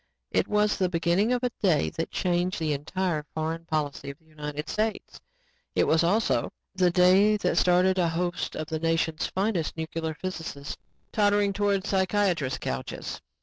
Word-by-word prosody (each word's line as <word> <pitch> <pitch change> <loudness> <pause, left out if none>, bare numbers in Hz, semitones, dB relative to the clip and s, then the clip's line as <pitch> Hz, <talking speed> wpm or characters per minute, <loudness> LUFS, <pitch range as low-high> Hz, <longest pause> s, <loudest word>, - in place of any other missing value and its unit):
It - - +1
was 210 0 +2
the 185 -2 +1
beginning 175 +6 +1
of 250 0 0
a 250 - +1
day 175 -7 +2
that 165 - -3
changed 180 +1 0
the 155 -2 0
entire 160 +2 -2
foreign 160 +1 -3
policy 145 -3 -2
of 140 - -8
the 160 - -32
United 150 -1 -6
States. 215 0 -2 0.6
It - - +4
was 160 +1 +3
also 205 +6 +1 0.2
the 185 -2 +3
day 190 +4 +5
that - - 0
started 185 +1 +3
a 170 -2 +3
host 175 +2 -2
of 155 - -3
the 160 0 -3
nation's 165 -1 0
finest 190 -5 -1
nuclear 160 0 -3
physicists 160 -5 -5 0.4
tottering 205 -1 +2
towards 200 0 0
psychiatrists' 190 -8 +1
couches. 65 0 -5
175 Hz, 160 wpm, -27 LUFS, 160-195 Hz, 0.6 s, day